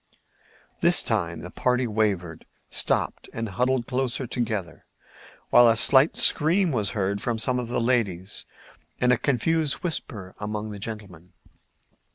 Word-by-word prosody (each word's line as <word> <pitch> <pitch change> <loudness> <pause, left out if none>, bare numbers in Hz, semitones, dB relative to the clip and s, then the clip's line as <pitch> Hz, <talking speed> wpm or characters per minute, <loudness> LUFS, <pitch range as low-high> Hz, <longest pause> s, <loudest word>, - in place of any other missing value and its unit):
This - - +5
time - - -2
the - - -9
party 125 0 0
wavered, 100 -7 -2 0.2
stopped - - 0
and 115 0 -4
huddled 125 +5 0
closer 130 0 -2
together, 110 -8 -4 0.6
while 120 -1 +7
a 115 - +3
slight 130 +6 +5
scream 170 +4 +2
was 105 -6 0
heard 100 +1 -1
from 120 -1 -2
some 125 +2 0
of 120 - -4
the 120 - -2
ladies 105 -6 -1 0.5
and 125 0 +3
a - - +2
confused 150 +3 0
whispering 110 - -4
among 105 0 -5
the 100 - -8
gentlemen. 95 -5 -8
115 Hz, 140 wpm, -24 LUFS, 100-130 Hz, 0.6 s, while